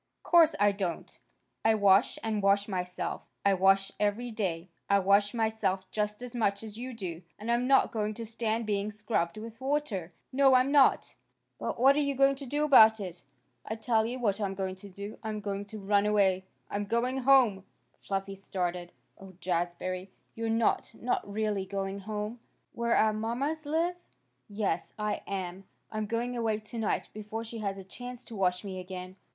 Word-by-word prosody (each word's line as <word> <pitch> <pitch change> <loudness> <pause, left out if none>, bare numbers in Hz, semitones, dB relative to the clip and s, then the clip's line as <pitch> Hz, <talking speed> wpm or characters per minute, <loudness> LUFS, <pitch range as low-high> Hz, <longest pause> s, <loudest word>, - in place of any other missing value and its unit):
"Course 330 -2 +5
I 205 0 +5
don't. 190 -4 -4 0.4
I 225 0 +4
wash 200 0 +4
and 215 -2 -1
wash 200 +1 +3
myself. 180 -2 -3 0.2
I 200 - +5
wash 195 +1 +4
every 210 +4 0
day. 185 -6 -2 0.2
I 200 - +5
wash 200 +1 +4
myself 220 -5 0
just 210 +2 -2
as 250 -1 -7
much 200 -3 0
as 215 -2 -7
you 250 +3 -5
do. 180 -8 -6 0.2
And 220 +3 -3
I'm 240 +1 +1
not 270 0 +4
going 215 -1 -2
to 230 - -5
stand 225 0 -1
being 205 -1 -1
scrubbed 210 -4 -1
with 230 +3 -9
water. 265 - -1 0.2
No, 270 0 +5
I'm 255 +2 +4
not." 285 -2 +4 0.5
"But - - -3
what 270 +3 +6
are - - +2
you 280 -2 0
going 275 +1 +5
to 275 -1 -7
do 295 +4 0
about 220 -6 +7
it?" 180 -3 -6 0.4
"I'll 220 - -5
tell 220 0 +2
you 245 +2 -4
what 215 -4 0
I'm 195 -1 -1
going 190 -1 -2
to 200 +2 -11
do. 200 +3 -8
I'm 215 -1 -3
going 200 -1 -4
to 215 +2 -9
run 200 0 +2
away. 190 -3 +3 0.2
I'm 205 0 -2
going 240 +5 0
home!" 250 -7 +4 0.4
Fluffy 195 0 -3
started. 180 -2 -3 0.3
"Oh, 195 -1 -12
Jazbury! 180 +1 -2 0.2
You're 225 0 -3
not 225 0 +1
not 235 -4 -2
really 205 -2 -1
going 195 0 -3
home? 210 +3 -4 0.3
Where 235 0 +1
our 215 0 +4
mommas 270 +8 -2
live?" 335 +4 0 0.5
"Yes, 200 -5 -2
I 210 0 -2
am. 190 -1 -4 0.3
I'm 215 -1 -2
going 235 +3 -2
away 225 -2 0
tonight 215 0 -2
before 215 +1 -5
she 230 0 -7
has 200 -2 -2
a 195 - -8
chance 245 +6 -8
to 230 - -9
wash 180 -2 +1
me 190 -2 -5
again." 185 0 -7
210 Hz, 180 wpm, -30 LUFS, 195-235 Hz, 0.5 s, about